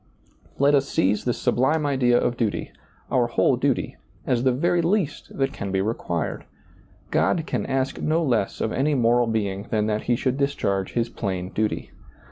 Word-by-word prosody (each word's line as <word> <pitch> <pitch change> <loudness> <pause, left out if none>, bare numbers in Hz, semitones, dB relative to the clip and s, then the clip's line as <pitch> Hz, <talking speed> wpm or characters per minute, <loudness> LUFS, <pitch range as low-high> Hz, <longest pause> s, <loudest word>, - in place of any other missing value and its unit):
Let 140 +1 +4
us 140 -1 +2
seize 100 +3 +1
this 120 - 0
sublime 150 +5 +1
idea 125 -4 +3
of 120 - 0
duty, 115 -4 -2 0.4
our - - +3
whole - - +2
duty, - - -1 0.3
as 120 -2 +1
the 130 0 +3
very 170 +7 +1
least 170 -3 -1
that 135 0 0
can 100 -6 -5
be 95 - +1
required. 95 -5 -2 0.7
God 165 -3 +2
can 125 -9 -2
ask 135 0 -1
no 160 +2 +1
less 120 -9 0
of 110 - 0
any 145 +3 +1
moral 120 -1 +3
being 100 -2 -2
than 105 -2 +1
that 105 0 -1
he 120 - +2
should 130 +2 -1
discharge 100 -9 -1
his 120 -1 +1
plain 95 -5 -3
duty. 110 0 -2
120 Hz, 175 wpm, -24 LUFS, 105-140 Hz, 0.7 s, Let